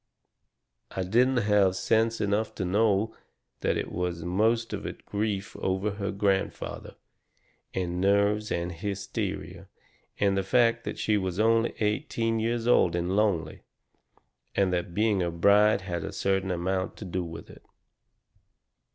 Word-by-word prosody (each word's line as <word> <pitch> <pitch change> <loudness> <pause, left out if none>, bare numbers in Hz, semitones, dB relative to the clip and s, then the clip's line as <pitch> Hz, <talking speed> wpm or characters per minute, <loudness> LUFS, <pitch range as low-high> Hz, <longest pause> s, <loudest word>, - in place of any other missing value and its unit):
"I 95 - -3
didn't 120 +5 +3
have 100 -3 +3
sense 115 +3 +1
enough 105 +2 0
to 95 - -2
know 105 +2 +2 0.4
that - - 0
it - - -4
was 90 -1 -3
most 110 +6 +1
of - - -4
it - - -9
grief 100 -1 -2
over 95 +3 -1
her 100 0 -4
grandfather, 100 -1 -2 0.8
and 90 -1 -2
nerves 100 +2 +2
and 85 +1 -1
hysteria, 100 +3 -4 0.5
and 100 -1 +3
the 95 - +1
fact 115 +3 +2
that - - -4
she 105 -1 +1
was 95 0 -3
only 115 +1 +3
eighteen 115 +1 0
years 115 +1 -1
old 105 -8 +4
and 90 +2 -1
lonely, 100 -6 0 0.9
and 95 -2 +2
that 85 -1 -2
being 105 -2 +2
a 85 - 0
bride 100 +5 +4
had 85 -3 -4
a - - -5
certain 95 -1 0
amount 95 +1 -2
to 105 - -7
do 90 0 -2
with 85 -1 -9
it. - - -16
100 Hz, 145 wpm, -27 LUFS, 95-110 Hz, 0.9 s, old